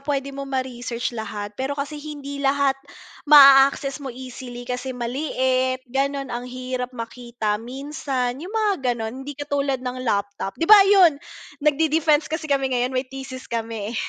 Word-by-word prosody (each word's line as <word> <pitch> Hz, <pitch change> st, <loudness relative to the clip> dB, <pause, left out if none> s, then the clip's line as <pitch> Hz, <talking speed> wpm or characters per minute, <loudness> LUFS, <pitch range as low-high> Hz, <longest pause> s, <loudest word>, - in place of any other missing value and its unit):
puwede 275 Hz, -1 st, -2 dB
mo 275 Hz, 0 st, -6 dB
ma-research 245 Hz, -3 st, -3 dB
lahat, 210 Hz, -1 st, -5 dB
pero 265 Hz, +2 st, -2 dB
kasi 295 Hz, +1 st, -4 dB
hindi 290 Hz, -2 st, -7 dB
lahat 275 Hz, 0 st, +2 dB, 0.5 s
ma-access 275 Hz, -1 st, +7 dB
mo 275 Hz, -, -6 dB
easily, 250 Hz, -1 st, -8 dB
kasi 250 Hz, +1 st, -4 dB
maliit, 255 Hz, 0 st, 0 dB
ganon 275 Hz, +1 st, -1 dB
ang 240 Hz, +1 st, -4 dB
hirap 255 Hz, 0 st, -5 dB
makita 230 Hz, -2 st, -3 dB
minsan, 260 Hz, 0 st, -3 dB
yung 365 Hz, +6 st, -8 dB
mga 430 Hz, -2 st, +2 dB, 0.2 s
ganon 225 Hz, +2 st, -5 dB
hindi 290 Hz, +1 st, -6 dB
katulad 285 Hz, -2 st, -1 dB
ng 250 Hz, 0 st, -4 dB
laptop, 200 Hz, -2 st, -2 dB
'di 330 Hz, -, 0 dB
ba 425 Hz, -, +11 dB
yun 365 Hz, -7 st, +6 dB, 0.4 s
nag 300 Hz, 0 st, +3 dB
de-defense 310 Hz, -1 st, +2 dB
kasi 315 Hz, 0 st, -3 dB
kami 270 Hz, -2 st, +1 dB
ngayon 250 Hz, +1 st, 0 dB
may 255 Hz, +1 st, 0 dB
thesis 265 Hz, 0 st, -8 dB
kami, 225 Hz, -2 st, -3 dB
eh, -, -, -8 dB
265 Hz, 160 wpm, -23 LUFS, 245-285 Hz, 0.5 s, ba